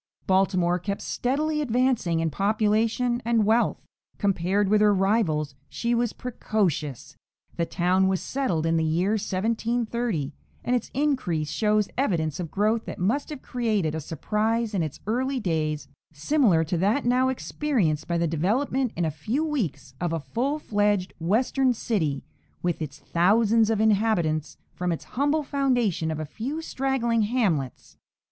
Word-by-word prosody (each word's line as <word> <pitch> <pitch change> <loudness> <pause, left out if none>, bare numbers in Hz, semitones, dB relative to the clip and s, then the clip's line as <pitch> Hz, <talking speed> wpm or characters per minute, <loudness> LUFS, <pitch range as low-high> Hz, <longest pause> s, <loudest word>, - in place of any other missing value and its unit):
Baltimore 185 -2 +2
kept 200 +3 -4
steadily 300 +4 -1
advancing 245 - +1
in 165 -1 0
population 220 - +1
and 230 -2 +2
wealth; 225 +3 +1 0.3
compared 195 0 +1
with 210 +1 +3
her 210 -1 +5
rivals, 185 -8 +1 0.2
she 235 +10 -1
was 235 -1 +1
precocious. 190 - -2 0.4
The 170 - -1
town 185 +1 +2
was 190 -1 +1
settled 190 - -1
in 165 0 +2
the 160 - +1
year 170 +5 +1
1730, 220 - -1 0.3
and 250 - +1
its 240 - -2
increase 250 - 0
shows 210 -1 +2
evidence 165 - 0
of 170 -3 -4
growth 215 +5 +1
that - - -6
must 225 +11 0
have 295 -3 -7
created 215 -10 0
a 160 - -2
surprise 215 +9 -1
in 190 - +1
its 155 -2 -4
early 255 +5 0
days 155 -6 -1 0.2
similar 170 - +2
to 165 +1 -2
that 210 +9 +1
now 255 +2 +3
experienced 240 - -1
by 170 - 0
the 170 - +1
development 220 - 0
in 170 - 0
a 160 - 0
few 235 - -2
weeks 170 - -3
of 175 -2 0
a 165 - 0
full 245 - -2
fledged 205 -7 0
Western 250 +9 +2
city, 165 - -1 0.4
with 175 -2 -1
its 150 -1 -5
thousands 215 +7 +3
of 220 -2 +1
inhabitants, 200 -8 +1 0.2
from 180 0 -2
its 165 - -3
humble 290 +4 +1
foundation 245 - 0
of 155 -1 -3
a 155 - -3
few 255 - -4
straggling 260 -6 0
hamlets. 205 - -1
210 Hz, 155 wpm, -25 LUFS, 170-240 Hz, 0.4 s, her